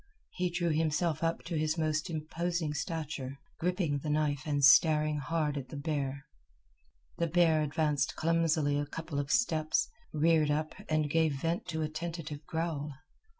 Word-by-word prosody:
He 180 -1 -1
drew 170 -1 0
himself 160 +1 0
up 165 0 0
to 170 - -4
his 155 +1 0
most 155 0 0
imposing 165 0 -2
stature, 150 -4 -4 0.2
gripping 175 -4 0
the 150 - -4
knife 150 -2 0
and 145 -2 +3
staring 155 +1 +6
hard 150 0 -1
at 130 - -9
the 145 - -7
bear. 140 -2 -2 0.9
The 170 - +2
bear 165 -2 +4
advanced 150 -2 0
clumsily 160 -3 +2
a 145 - -2
couple 160 -1 -4
of 140 -1 -3
steps, 160 -10 +2 0.2
reared 155 0 +3
up, 155 +1 0 0.2
and 155 -1 +2
gave 160 -1 +2
vent 165 +4 -1
to 160 -2 -2
a - - 0
tentative 155 -1 -5
growl. 160 -3 -2
155 Hz, 155 wpm, -31 LUFS, 150-165 Hz, 0.9 s, staring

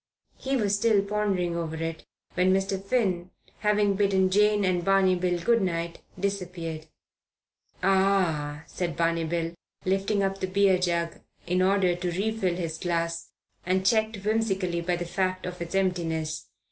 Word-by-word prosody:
He 270 0 0
was 205 -4 +2
still 205 -1 +3
pondering 200 -4 0
over 165 -2 -3
it 165 0 -5 0.3
when 180 +1 +3
Mr. 195 0 0
Finn, 195 -6 0 0.3
having 210 -1 +2
bidden 190 -1 +2
Jane 210 0 +4
and 180 -2 +1
Barney 195 0 +4
Bill 180 -1 0
good 230 +5 +3
night, 170 -2 -2 0.2
disappeared. 180 -5 -3 1.0
"Ah!" 180 -6 +2
said 170 -4 -4
Barney 165 0 +1
Bill, 165 0 -2 0.3
lifting 195 +2 +1
up 195 0 -1
the 185 - -1
beer 190 -1 +3
jug 170 -2 -1 0.3
in 180 +1 +1
order 185 -1 +3
to 180 0 -3
refill 195 -1 0
his 165 -2 -4
glass, 170 -1 -2 0.3
and 185 +1 0
checked 220 +1 +2
whimsically 195 -6 0
by 175 +1 0
the 175 0 -4
fact 185 +1 -1
of 180 -1 -6
its 170 +2 -4
emptiness. 165 -5 -1
185 Hz, 150 wpm, -27 LUFS, 170-195 Hz, 1.0 s, Jane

